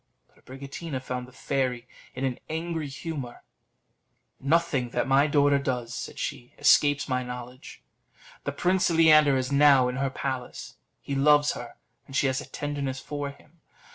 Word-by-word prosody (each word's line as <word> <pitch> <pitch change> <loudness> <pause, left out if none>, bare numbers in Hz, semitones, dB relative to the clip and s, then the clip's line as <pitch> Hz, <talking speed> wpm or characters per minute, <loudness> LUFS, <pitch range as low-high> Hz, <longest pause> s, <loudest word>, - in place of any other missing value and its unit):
But - - -26
Abricotina 140 +2 -6
found 125 -1 -5
the - - -15
fairy 125 -2 -2 0.3
in 130 +1 -2
an 130 -2 -2
angry 160 -1 -3
humour. 140 -3 -6 1.0
"Nothing 140 -4 +1
that - - -1
my 135 +2 +4
daughter 145 -1 +3
does," 125 -4 -3
said - - -6
she, 120 - -5
"escapes 145 0 +4
my 130 -2 0
knowledge. 125 +1 -9 0.6
The - - -2
Prince 185 +1 +1
Leander 155 -4 +5
is 130 +1 -2
now 140 -3 +5
in 125 - -4
her 135 0 0
palace; 130 -1 -5 0.3
he 140 - -4
loves 145 +1 +4
her, - - -8 0.3
and 135 - -9
she 140 - +2
has 130 0 0
a - - -9
tenderness 140 -3 -3
for 145 +1 -5
him. 150 +3 -18
140 Hz, 160 wpm, -27 LUFS, 130-150 Hz, 1.0 s, Leander